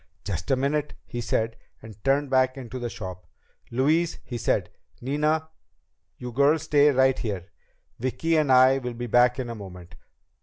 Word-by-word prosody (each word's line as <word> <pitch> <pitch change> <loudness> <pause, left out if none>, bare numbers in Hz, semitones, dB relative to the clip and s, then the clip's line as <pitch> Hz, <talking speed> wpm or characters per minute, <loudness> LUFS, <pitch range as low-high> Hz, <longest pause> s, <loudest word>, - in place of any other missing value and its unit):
"Just 85 -4 -4
a 135 - +4
minute," 145 +3 -1
he 120 - -5
said, 115 -1 -1 0.2
and 110 -2 -13
turned 135 0 +1
back 130 0 +3
into 130 -1 -7
the 120 -1 -3
shop. 90 -5 -8 0.4
"Louise," 155 +7 +1
he 125 - -7
said. 115 -2 0 0.3
"Nina. 150 +4 0 0.7
You 125 0 -7
girls 140 +5 +3
stay 150 -1 +4
right 130 -1 +3
here. 95 -6 -4 0.5
Vicki 130 +7 0
and 150 -4 +2
I 130 +1 +6
will 125 -2 -5
be 120 +1 -4
back 120 +1 +4
in 130 -2 -3
a 120 - -5
moment." 90 -5 -10
130 Hz, 165 wpm, -25 LUFS, 115-140 Hz, 0.7 s, I